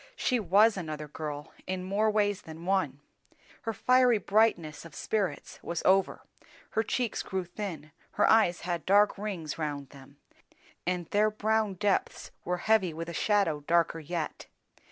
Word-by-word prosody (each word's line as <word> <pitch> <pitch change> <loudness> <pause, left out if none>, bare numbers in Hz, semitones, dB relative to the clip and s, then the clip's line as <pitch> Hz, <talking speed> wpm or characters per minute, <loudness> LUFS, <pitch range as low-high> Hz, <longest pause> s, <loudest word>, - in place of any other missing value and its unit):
she 250 - +1
was 205 +3 +4
another 155 -4 -5
girl 150 0 -6
in 185 0 -3
more 200 +4 +1
ways 205 -1 +1
than 160 +1 -10
one; 180 -8 0 0.6
her 225 - -2
fiery 250 +2 +4
brightness 200 -7 +1
of 170 - -12
spirits 205 -4 -2
was 170 -1 -4
over, 190 +1 +3 0.5
her 220 - +1
cheeks 235 +1 -1
grew 190 -1 -3
thin, 175 -5 -6 0.2
her - - +3
eyes 215 -6 +4
had 175 -2 -3
dark 205 +2 +5
rings 190 -7 -5
round 145 -3 -3
them, 140 0 -15 0.7
and 180 -1 -1
their 210 +1 +3
brown 215 -1 0
depths 200 +1 -1
were 180 +1 -1
heavy 190 -4 +2
with 165 +1 -5
a - - -6
shadow 195 -5 +1
darker 170 -1 +2
yet. 165 +1 -5
185 Hz, 155 wpm, -29 LUFS, 165-210 Hz, 0.7 s, dark